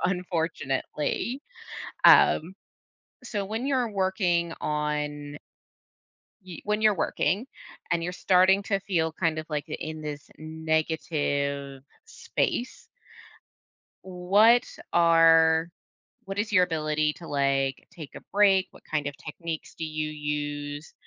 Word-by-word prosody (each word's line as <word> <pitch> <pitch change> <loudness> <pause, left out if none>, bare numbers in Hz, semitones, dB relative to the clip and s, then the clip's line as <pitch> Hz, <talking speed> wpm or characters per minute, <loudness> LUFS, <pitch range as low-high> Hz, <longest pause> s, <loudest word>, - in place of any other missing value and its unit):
unfortunately. 175 - -2 0.6
Um, 175 +5 +6 0.7
so, 210 -5 -3
when 220 +6 -4
you're 260 -4 +1
working 185 -3 0
on 150 -1 -3 1.1
y 175 -3 -8
when 210 +1 0
you're 215 -1 +5
working 200 +4 0 0.4
and 170 0 +1
you're 180 +2 -3
starting 185 +2 +4
to 200 -1 0
feel 165 -5 -1
kind 160 -2 -1
of, 155 - -5
like, 150 -1 -3
th - - -6
in 155 0 -5
this 145 -1 -7
negative 155 -3 -2 0.2
space 245 - -3 1.2
what 200 +6 +4 0.3
are 165 -1 +5 0.6
what 195 +1 -6
is 210 +1 -1
your 185 -3 +6
ability 155 -3 0
to, 170 - -12
like, 135 -1 0
take 155 -5 -11
a - - -8
break? 195 -2 +4
What - - -18
kind 150 -2 -2
of 145 - -4
techniques 160 +1 -7
do 160 - -5
you 155 0 -3
use? 145 0 -4
165 Hz, 120 wpm, -26 LUFS, 150-190 Hz, 1.2 s, Um